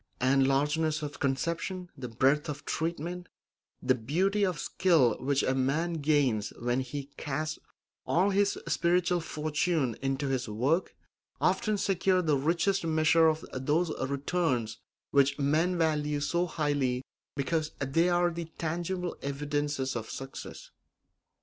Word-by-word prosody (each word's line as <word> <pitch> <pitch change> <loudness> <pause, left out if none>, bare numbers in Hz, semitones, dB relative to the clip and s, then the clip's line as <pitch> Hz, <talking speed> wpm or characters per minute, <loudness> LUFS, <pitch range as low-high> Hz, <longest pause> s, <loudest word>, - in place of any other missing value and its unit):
And 130 +2 +3
the 135 - +4
largeness 150 +3 +1
of 145 -1 -6
conception, 170 +6 -2
the 130 -3 -6
breadth 135 +6 +2
of 150 0 -6
treatment, 170 +2 -3 0.5
the 130 - +4
beauty 180 - 0
of 185 -5 +1
skill 155 - +3
which 140 +1 +1
a 130 - +1
man 140 +6 0
gains 140 -8 +2
when 120 +2 0
he 135 +2 -5
casts 155 +2 -3 0.5
all 190 +4 +3
his 200 +1 +2
spiritual 175 0 +2
fortune 155 -4 -1
into 135 +1 -1
his 130 -3 -1
work 135 - 0 0.4
often 215 -1 +1
secure 190 -1 +2
the 155 -3 +2
richest 170 +7 +1
measure 160 0 +4
of 160 0 0
those 150 +6 0
returns 135 -4 -1 0.3
which 140 0 +3
men 155 +6 +2
value 150 -3 +1
so 170 +4 0
highly 145 -6 0 0.3
because 155 +2 -1
they 155 +6 +2
are 175 0 +2
the 170 0 -5
tangible 175 +2 -2
evidences 145 -1 -2
of 110 -1 -4
success. 135 0 -8
150 Hz, 135 wpm, -29 LUFS, 135-170 Hz, 0.5 s, the